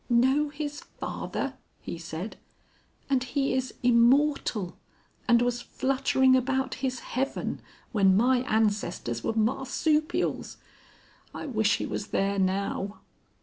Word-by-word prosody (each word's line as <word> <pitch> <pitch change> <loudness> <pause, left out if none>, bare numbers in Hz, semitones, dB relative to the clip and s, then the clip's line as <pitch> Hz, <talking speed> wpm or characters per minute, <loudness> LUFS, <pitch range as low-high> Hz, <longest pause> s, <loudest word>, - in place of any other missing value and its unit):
"Know 260 +5 +3
his 295 0 -5
father!" - - -4 0.3
he 170 - -6
said. 170 +5 -6 0.7
"And 265 -2 +2
he 270 +2 0
is 260 -1 -2
immortal, 240 -4 +3 0.5
and 240 -1 +5
was 240 0 0
fluttering 265 0 +2
about 265 0 0
his 255 -2 -2
heaven 270 +3 -3 0.3
when 195 -4 +4
my 250 +3 +4
ancestors 205 - 0
were - - 0
marsupials.... 270 +8 0 0.8
I - - -5
wish 220 -6 +2
he - - -3
was 205 - -4
there 195 0 0
now." 195 +2 -1
245 Hz, 115 wpm, -28 LUFS, 210-265 Hz, 0.8 s, and